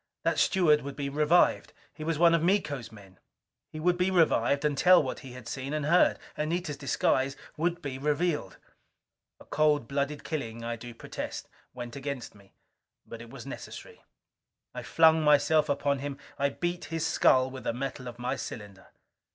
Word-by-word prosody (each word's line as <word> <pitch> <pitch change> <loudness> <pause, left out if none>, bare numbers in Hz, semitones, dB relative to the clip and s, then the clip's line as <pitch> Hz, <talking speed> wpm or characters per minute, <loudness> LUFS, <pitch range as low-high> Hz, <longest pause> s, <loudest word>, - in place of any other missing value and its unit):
That - - +1
steward 160 -6 +4
would 140 0 -7
be 140 -1 -3
revived. 150 +4 +2 0.2
He 155 - -8
was 165 -1 -1
one 170 +1 +5
of 165 - +3
Miko's 155 - 0
men. 100 -4 -15 0.5
He 155 - -7
would 175 +2 +1
be 180 +1 +2
revived 150 -6 +2
and 150 -1 +1
tell 180 +3 +6
what 130 - -4
he 130 -2 -11
had 125 -2 -10
seen 135 +3 -4
and 150 -1 -1
heard. 170 +4 +4 0.2
Anita's 160 0 -2
disguise 135 0 0 0.2
would 175 +2 -1
be 135 -2 -5
revealed. 150 - -1 0.8
A - - -15
cold 150 -5 +2
blooded 140 +2 -2
killing, 115 -7 -4
I 115 0 -3
do 120 +1 -10
protest, - - -6 0.3
went 120 -1 -7
against 140 -2 -5
me. 100 -1 -20 0.5
But 115 - -9
it 115 - -11
was - - -10
necessary. - - -9 0.7
I - - -5
flung 160 0 +4
myself 150 +1 +4
upon 140 0 0
him. 140 0 -5 0.2
I 140 0 +2
beat 175 +3 -3
his 165 +1 -3
skull 130 0 +3
with 130 0 -8
the - - +1
metal 130 0 -5
of 120 -1 -8
my 125 +2 -2
cylinder. 100 -6 -8
145 Hz, 175 wpm, -29 LUFS, 130-160 Hz, 0.8 s, tell